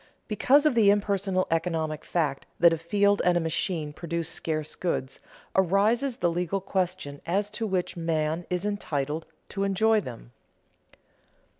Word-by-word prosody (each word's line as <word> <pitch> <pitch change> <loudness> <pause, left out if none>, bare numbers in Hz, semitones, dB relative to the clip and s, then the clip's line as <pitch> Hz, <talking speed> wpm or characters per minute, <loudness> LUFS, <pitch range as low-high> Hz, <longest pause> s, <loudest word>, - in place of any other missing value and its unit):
Because 270 +7 +4
of 305 - +4
the 220 -4 +5
impersonal 200 -2 +1
economic 160 -2 -1
fact 150 -6 -1
that 170 0 +7
a - - 0
field 200 +4 +2
and 180 -1 +3
a - - +3
machine 160 -1 -2
produce 170 0 -3
scarce 155 -1 -3
goods, 135 -7 -3 0.4
arises 210 +8 +2
the 175 -1 +1
legal 180 +3 -1
question 180 -6 -2
as 200 +4 0
to 220 +1 -3
which 185 -3 -1
man 165 0 -1
is 180 +2 -1
entitled 160 -6 -2 0.2
to 195 - -2
enjoy 215 +3 +3
them. 115 - -9
180 Hz, 145 wpm, -27 LUFS, 160-200 Hz, 0.4 s, that